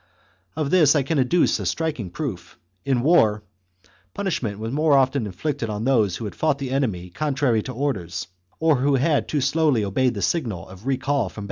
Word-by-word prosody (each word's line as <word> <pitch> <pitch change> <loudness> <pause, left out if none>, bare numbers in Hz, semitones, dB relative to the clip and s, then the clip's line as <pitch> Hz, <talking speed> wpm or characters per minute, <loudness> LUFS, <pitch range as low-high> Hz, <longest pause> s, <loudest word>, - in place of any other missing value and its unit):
Of 155 -2 -2
this 160 -5 +5
I 145 - +3
can 145 +2 0
adduce 135 +7 +2
a - - -4
striking 155 - -2
proof; 95 - -6 0.3
in 130 0 +1
war, 110 -9 +3 0.7
punishment 160 - -2
was 110 +2 -4
more 150 +1 +2
often 130 -3 +1
inflicted 115 - -3
on 105 +1 -3
those 110 -9 +2
who 115 - -6
had 105 - -5
fought 155 -3 0
the 135 -2 -5
enemy 105 -10 -1
contrary 135 - 0
to 130 - -6
orders, 105 -10 -3 0.3
or 160 -3 +3
who 140 +2 +2
had 145 +3 +1
too 150 - -1
slowly 145 -5 +2
obeyed 120 +5 +1
the 100 - -3
signal 110 - -1
of 95 +6 -12
recall 135 +1 0
from - - -11
130 Hz, 190 wpm, -23 LUFS, 110-150 Hz, 0.7 s, this